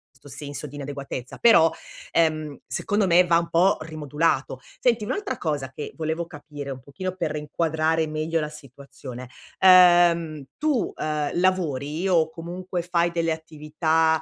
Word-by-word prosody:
'sto 135 - -17
senso 145 +1 -6
di 140 - -12
inadeguatezza, 140 -3 -6
però, 165 -9 +6 0.4
ehm, 155 -3 +1
secondo 205 -1 0
me, 180 +1 +5
va 170 -1 +4
un 170 - -5
po' 180 +4 +3
rimodulato. 150 -3 -1 0.2
Senti, 235 -3 +2
un'altra 400 - -3
cosa 145 -5 -3
che 150 - -7
volevo 160 +1 -2
capire 145 -2 -9
un 135 -1 -5
pochino 145 +8 -6
per 165 -4 -2
inquadrare 160 +1 0
meglio 155 +2 -1
la 150 - -2
situazione: 140 -3 -11 0.3
uhm, 175 -4 +6
tu, 295 -7 0
uhm, 150 -1 -2
lavori 165 -3 0
o, 165 -4 +3
comunque, 175 +2 -5
fai 175 -1 +1
delle 165 -1 0
attività 160 0 0
160 Hz, 145 wpm, -24 LUFS, 150-175 Hz, 0.4 s, però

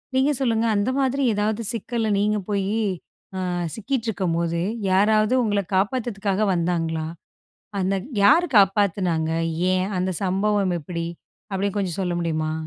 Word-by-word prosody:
நீங்க 270 +3 +3
சொல்லுங்க 230 -3 +1
அந்த 205 +5 +1
மாதிரி 270 +1 +1
ஏதாவது 210 +2 -1
சிக்கல்ல 230 0 -2
நீங்கப் 210 -1 0
போயி 200 +2 0 0.6
அ - - -2 0.3
சிக்கிட்டு 230 +2 -3
இருக்கும்போது 170 -4 -1 0.3
யாராவது 215 +4 +3
உங்கள 205 -3 +1 0.2
காப்பாத்துறதுக்காக 205 -1 0
வந்தாங்களா? 165 -2 -1 0.7
அந்த 190 +1 +1 0.3
யாரு 340 +13 +6
காப்பாத்துனாங்க? 190 -5 +3 0.4
ஏன் 185 +1 +1
அந்த 185 +1 0
சம்பவம் 195 0 +1
எப்படி? 170 +2 -4 0.5
அப்படின்னு 200 +1 -1
கொஞ்சம் 185 -3 -2
சொல்ல 180 -2 -1
முடியுமா? 155 -2 -1
200 Hz, 125 wpm, -23 LUFS, 180-215 Hz, 0.7 s, யாரு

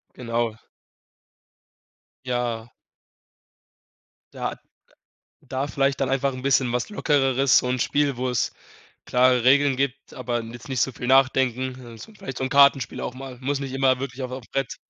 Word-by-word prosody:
Genau. 115 -2 -2 1.7
Ja. 120 -2 -2 1.6
Da - - -3 0.9
da 130 +2 -3
vielleicht 135 -1 0
dann 135 -1 0
einfach 135 0 +1
'n 130 0 -8
bisschen 130 -2 +2
was 125 - -2
Lockereres, 135 - +3
so 125 - +1
'n 125 0 -1
Spiel, 145 +1 +1
wo 125 +1 -2
es 125 -3 -1 0.5
klare 125 -1 +3
Regeln 140 0 +4
gibt, 140 0 -3
aber 120 -2 -2
jetzt 115 +3 -10
nicht 130 -3 -1
so 135 - +2
viel 125 - -6
nachdenken. 130 -1 +2
Also, 115 - -11
vielleicht 135 -10 -7
so 130 - -1
'n - - -1
Kartenspiel 140 -1 +4
auch 125 - -4
mal 130 -1 -9
muss 140 +2 -1
nicht 135 -1 -5
immer 130 -1 +2
wirklich 135 -1 -5
auf 125 - -4
auf 130 -1 -6
Brett. 135 -3 -2
130 Hz, 155 wpm, -24 LUFS, 125-135 Hz, 1.7 s, Regeln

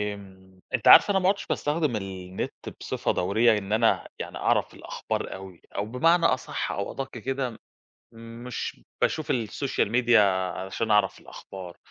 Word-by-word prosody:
م 95 -1 -16
أنتِ - - 0
عارفة - - +9
أنا 190 - +3
ما 185 +1 +3
عدتش 200 - -1
باستخدم 150 -4 0
النت 95 -2 -5 0.3
بصفة - - -1
دورية 110 +5 +3
إن 100 +1 -4
أنا 115 +1 +2
يعني - - -6
أعرف - - +1
الأخبار - - -4
أوي، 95 -2 -10
أو 100 - -1
بمعنى 165 +9 +3
أصح 130 - 0
أو 100 - -3
أدق 135 0 -5
كده 130 +2 -2
م 115 - -12 0.8
مش 125 - -5 0.2
باشوف 155 - 0
الSocial 125 +3 -1
media 120 -1 +4 0.4
علشان 95 +4 -3
أعرف 105 0 +3
الأخبار، 90 -3 -10
110 Hz, 150 wpm, -26 LUFS, 95-135 Hz, 0.8 s, عارفة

